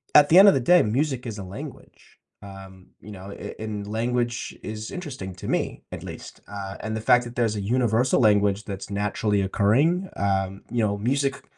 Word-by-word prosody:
at 145 -1 +8
the 170 - +6
end 200 - +9
of - - +5
the 135 - +2
day, 175 +8 +5
music 130 +3 -1
is 110 -3 -5
a 100 - -6
language, 95 +3 -11 0.2
um, 95 -1 -12
you 105 - -11
know, 95 +1 -9
a - - -8
and 105 -2 -5
language 120 +2 -2
is 110 0 -6
interesting 135 - -6
to 90 - -8
me, - - -2
at - - -7
least, - - -10
uh, 100 -1 -6
and 110 +1 -4
the 110 - -4
fact 125 +2 +4
that 120 0 -9
there's 115 -3 +1
a 105 - -3
universal 120 +3 +2
language 105 -2 +3
that's 100 -1 -7
naturally 105 0 0
occurring, 135 - +2
um, 95 -1 -1
you 120 -2 +1
know, 100 -1 -1
music 140 +5 -1
110 Hz, 195 wpm, -24 LUFS, 100-125 Hz, 0.2 s, end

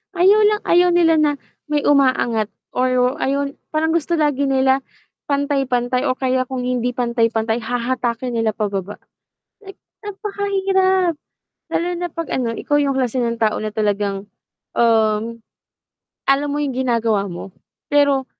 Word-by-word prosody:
Ayaw 390 +4 +5
lang 420 0 +3
ayaw 355 +1 +5
nila 335 -2 +4
na 300 -1 +3 0.4
may 295 -1 +1
umaangat 255 -6 +2 0.2
or 255 0 +2
ayaw 280 +1 0 0.2
parang 320 +1 +1
gusto 335 +1 0
lagi 290 -2 +1
nila 265 0 +2 0.5
pantay-pantay 265 -3 0
o 255 - +1
kaya 260 -1 +1
kung 260 0 -4
hindi 250 -1 0
pantay-pantay 230 -2 0
hahatakin 245 0 -2
nila 225 -1 +1
pababa. 200 -2 -4 0.6
Like, 390 -2 -12 0.3
napakahirap. 385 -4 0 0.6
Lalo 340 - +1
na 350 0 -2
'pag 330 -1 -4
ano 245 -3 -1
ikaw 290 - -2
yung 280 -1 +1
klase 255 -1 -1
ng 235 0 -2
tao 215 -1 +2
na 215 0 -4
talagang, 205 -1 -1 0.5
um, 225 0 +2 0.9
alam 280 +2 +3
mo 290 - -2
yung 275 -3 -2
ginagawa 230 -5 +1
mo 175 +3 -8 0.4
pero 285 -2 +3
260 Hz, 135 wpm, -20 LUFS, 230-295 Hz, 0.9 s, Ayaw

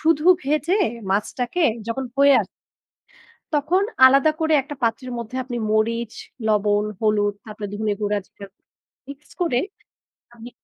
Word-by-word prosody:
শুধু 315 -1 +2 0.2
ভেজে 305 +7 +1 0.3
মাছটাকে 245 - -1 0.2
যখন 230 +3 -3
হয়ে 280 0 +6
আসে, - - -15 1.0
তখন 310 +6 +2 0.2
আলাদা 275 +4 +5
করে 320 0 +1
একটা 290 +2 -8
পাত্রের 240 +2 -1
মধ্যে 235 +2 -6
আপনি 245 -1 -5
মরিচ, 230 +1 0 0.4
লবণ, 210 0 +2 0.2
হলুদ, 210 -2 +1
তারপরে 215 -1 -7
ধনিয়া 210 0 -1
গুঁড়া 205 0 0
জিরার 200 0 -13 0.6
মিক্স 285 +1 -12
করে 255 -8 +1 0.8
আপনি 235 +1 -11
235 Hz, 130 wpm, -22 LUFS, 215-285 Hz, 1.0 s, হয়ে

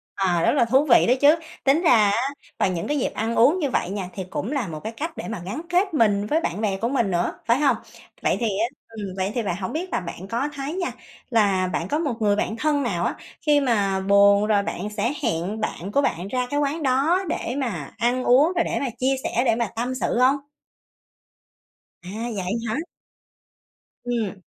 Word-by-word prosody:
À, 180 -3 +1
rất - - +3
là 275 -5 +3
thú 265 +5 +3
vị 240 - +6
đó 245 - +5
chứ. 295 +3 +7 0.3
Tính 280 +4 +3
ra 340 - +3 0.2
á, 230 +6 +1 0.3
vào - - +3
những 170 -2 -3
cái 295 - 0
dịp - - -1
ăn 225 +2 -2
uống 285 +11 +5
như 290 -5 0
vậy 185 - -1
nha 195 -2 -4
thì 190 - -4
cũng 215 - -3
là 275 -9 -1
một 155 -2 -6
cái 220 - -5
cách 320 +2 -4
để - - -5
mà 225 -4 -4
gắn 205 +12 -4
kết 365 +1 +2
mình 205 -7 +3
với 310 +9 +1
bạn 195 - -3
bè 200 -3 0
của 230 +4 -1
mình 235 -7 +1
nữa, 175 0 0
phải 235 +4 +3
hông? 285 -2 +3 0.5
Vậy - - +2
thì 235 - 0
á, 215 +2 0 0.2
ừm, 220 -2 -7
vậy 190 +2 -1
thì 240 - +1
bạn, 190 -4 -1
hổng 185 - -4
biết 355 +4 -3
là - - +2
bạn 180 +1 -8
có 240 +7 -1
thấy 280 +3 -4
nha, 360 -1 -2 0.4
là 200 -6 +2
bạn 175 -1 -2
có 300 - 0
một 295 -6 -1
người 205 -1 +3
bạn 215 +1 -1
thân 295 +2 +1
nào 175 -8 -1
á - - -1 0.3
khi 295 -2 +4
mà 205 -7 +1
buồn 200 +1 +5
rồi 205 -2 +3
bạn 200 0 -4
sẽ 235 +6 0
hẹn 205 0 -1
bạn 200 -2 -4
của 280 - +3
bạn 175 -7 -1
ra 250 +3 -1
cái 290 +2 0
quán 295 +3 -1
đó 290 +8 +2
để 245 - -2
mà 205 - -3
ăn 245 +2 +1
uống, 285 +8 +4
rồi 345 - +3
để - - -2
mà 275 - -1
chia 265 +1 +2
sẻ, 240 - 0
để 230 - +3
mà 235 -1 0
tâm 245 +3 -2
sự 250 - -1
hông? 260 +2 +5 1.7
À, 180 - -9 0.3
vậy 185 -1 -3 0.2
hả? 220 - -1 1.3
Ừm. 230 -5 -2
230 Hz, 225 wpm, -23 LUFS, 200-275 Hz, 1.7 s, chứ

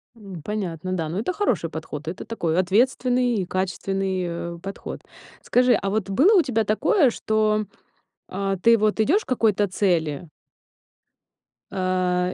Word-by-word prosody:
М, 195 -7 -10
понятно, 185 -3 -4
да. 165 -4 -2
Но 180 - -3
это 245 +12 -2
хороший 385 - 0
подход, 155 -1 -7
это 170 - -5
такой, 170 -7 -2
ответственный 245 +5 +2
и - - -3
качественный, 190 0 -2
э, 170 0 -5
подход. 195 +2 -7 0.4
Скажи, 250 0 +3
а 200 - -2
вот 205 -1 -2
было 340 - +5
у 355 - +6
тебя 225 -6 0
такое, 260 - +3
что, 215 -1 0 0.6
а, 195 0 -2
ты 230 +5 +5
вот 215 +1 +1
идёшь 340 - +3
к - - -51
какой-то 215 -5 +2
цели 170 -5 0 1.4
а, 185 -1 0
195 Hz, 145 wpm, -23 LUFS, 180-225 Hz, 1.4 s, у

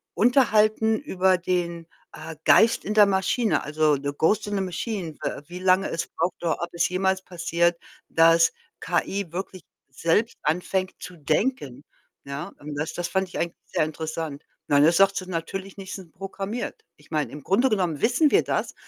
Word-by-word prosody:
unterhalten 220 -3 +3
über 190 -9 +2
den, 170 -2 -2 0.3
äh, 160 0 -8
Geist 225 +1 +5
in 210 - -1
der 210 -1 +7
Maschine, 200 +4 +1
also, 150 -1 +2
The 140 +1 -3
Ghost 205 +6 +2
in 205 - -2
the 195 - 0
Machine, 185 -2 -4
w - - -3
wie 175 +1 -8
lange 185 +1 +3
es 165 - -3
braucht, 170 +2 -2
oder 165 -2 -1
ob 170 - -3
es 170 0 +1
jemals 190 +1 0
passiert, 170 -1 0 0.3
dass 165 0 +5 0.3
KI 180 +1 -2
wirklich 185 0 -6 0.3
selbst 170 - 0
anfängt 180 +4 -1
zu 180 -1 -9
denken, 150 - -1 0.4
ja? 140 +7 -6
Und 145 0 -7
das 155 +3 -3
das 175 -1 -3
fand 190 0 -1
ich - - -7
eigentlich 170 0 -2
sehr 155 - 0
interessant. 155 -2 -5 0.2
Nein, 145 0 +4
das 170 - +4
sagt 195 0 +4
sie 185 - -3
natürlich 185 +3 -5
nicht, 195 -1 -7
sind 180 -5 -10
programmiert. 195 +4 -5
Ich 150 - -23
meine, 155 -2 -1
im 145 -1 -9
Grunde 215 - +3
genommen 180 - 0
wissen 255 +6 +3
wir - - +4
das, - - -2
180 Hz, 180 wpm, -25 LUFS, 160-195 Hz, 0.4 s, der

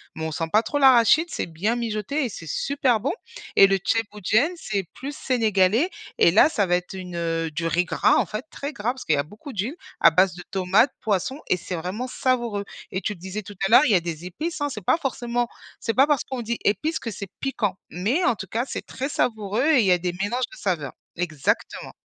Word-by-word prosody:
mais 160 - -5
on 160 - -3
sent 165 +1 -2
pas 215 +2 +4
trop 290 +5 -2
l'arachide, 265 +4 +6
c'est - - -3
bien 180 +8 -1
mijoté 235 +5 -2
et 240 - -2
c'est 165 -4 -9
super 260 -5 +1
bon. 260 - -1 0.4
Et 195 - +8
le 195 - +2
thiéboudiène, 220 - +1
c'est 200 - -3
plus 280 +1 -6
sénégalais 225 - +2 0.3
et 170 - +5
là, 220 - +6
ça 205 -9 +1
va 175 - +2
être 180 +1 -8
une, 180 -2 -7
heu, 165 -1 -1
du 165 +2 -2
riz 175 +2 +1
gras, - - +3
en - - +2
fait, 215 +7 -5
très 280 +2 -5
gras, 220 +1 -1
parce 260 - -9
qu'il 155 - +3
y - - -1
a 140 - +1
beaucoup 215 - -11
d'huile, 215 - -2 0.2
à 165 - +7
base 185 +3 +4
de 180 - -9
tomates, 190 +7 +3
poisson, 220 - -1
et 185 - +3
c'est 180 - -5
vraiment 185 +9 -4
savoureux. 240 -6 -1 0.3
Et 185 - -2
tu 210 - -2
disais 190 +4 -6
tout 205 0 -11
à - - -5
l'heure, 260 - +8
il - - +2
y 200 - +6
a - - +5
des 170 0 -6
épices, 305 - -4
hein. 290 - +1
C'est 220 -6 -6
pas - - +4
forcément 245 -5 -1 0.3
c'est 225 - -1
pas 270 +3 +5
parce 295 -4 +2
qu'on 260 -2 -5
dit 235 0 -2
épices 305 - +1
que 230 - -5
c'est 200 0 -6
piquant, 215 -8 -1
mais 230 - 0
en 240 - +3
tout 190 0 -7
cas, 235 +7 -1
c'est - - -5
très 270 +3 -4
savoureux 220 0 0
et 310 -5 +5
il - - +1
y 185 - +4
a 180 - +5
des 175 0 -3
mélanges 215 +8 -1
de 380 - -12
saveurs. 160 -9 -2 0.2
Exactement. 155 -5 -2
210 Hz, 240 wpm, -24 LUFS, 180-255 Hz, 0.4 s, Et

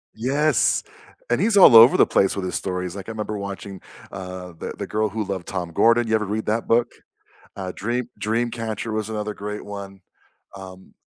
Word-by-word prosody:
Yes, 140 +7 +1 0.5
and - - +1
he's 220 -2 +2
all 180 -11 +9
over 115 +3 +9
the - - +6
place 95 - +2
with 100 - -3
his 90 - -3
stories, 90 -1 -3
like, 100 -2 -8
I - - -3
remember 105 -1 -4
watching, 100 -1 -7 0.3
uh, 90 -1 -8
The - - -5
The - - -5
Girl 110 0 0
Who 110 +2 -3
Loved 95 -3 -5
Tom 90 -3 -4
Gordon, 115 +6 +3
you 110 - +2
ever 110 -1 0
read 105 +2 -3
that 110 +2 -1
book? 120 +1 +2 0.7
Uh, 95 -2 -5
Dream 120 +2 -3
Dreamcatcher 115 0 -2
was 110 -1 -2
another 105 -1 -4
great 105 +1 -6
one, 100 -1 -8 0.6
um 95 -1 -12
105 Hz, 190 wpm, -22 LUFS, 95-115 Hz, 0.7 s, all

